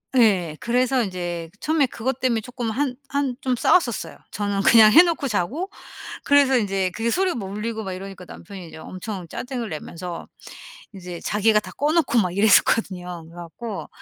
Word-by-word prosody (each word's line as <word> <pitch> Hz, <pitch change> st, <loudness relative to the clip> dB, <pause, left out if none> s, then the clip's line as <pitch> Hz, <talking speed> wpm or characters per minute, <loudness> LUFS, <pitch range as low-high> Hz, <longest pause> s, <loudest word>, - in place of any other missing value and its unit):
예. 190 Hz, -10 st, +3 dB
그래서 250 Hz, +1 st, +2 dB
인제 175 Hz, -4 st, -4 dB
처음에 310 Hz, -2 st, +2 dB
그것 250 Hz, +2 st, -3 dB
때문에 245 Hz, -3 st, +2 dB
쪼끔 240 Hz, 0 st, -5 dB
한 260 Hz, +2 st, -1 dB
한 280 Hz, -2 st, -1 dB
좀 255 Hz, -1 st, 0 dB
싸웠었어요. 245 Hz, -, +1 dB
저는 205 Hz, -1 st, -1 dB
그냥 215 Hz, +1 st, +7 dB
해 340 Hz, -, +10 dB
놓고 330 Hz, -5 st, -1 dB
자고 250 Hz, -, -2 dB, 0.5 s
그래서 280 Hz, -2 st, +4 dB
인제 195 Hz, -4 st, 0 dB
그게 225 Hz, +5 st, -2 dB
소리가 370 Hz, -1 st, +1 dB
뭐 195 Hz, -5 st, -5 dB
울리고 220 Hz, +2 st, -4 dB
막 190 Hz, -2 st, -4 dB
이러니까 190 Hz, 0 st, -8 dB
남편이 180 Hz, 0 st, -10 dB
이제 -, -, -11 dB
엄청 185 Hz, +2 st, -7 dB
짜증을 245 Hz, -, -5 dB
내면서 170 Hz, +2 st, -7 dB, 0.7 s
이제 180 Hz, -2 st, -8 dB
자기가 210 Hz, +1 st, +2 dB
다 -, -, -11 dB
꺼 295 Hz, +2 st, +1 dB
놓고 320 Hz, -7 st, +2 dB
막 180 Hz, -3 st, -1 dB
이랬었거든요. 185 Hz, -4 st, +2 dB
그래 165 Hz, -, -16 dB
갖고 190 Hz, +5 st, -7 dB
215 Hz, 365 characters per minute, -23 LUFS, 185-255 Hz, 0.7 s, 해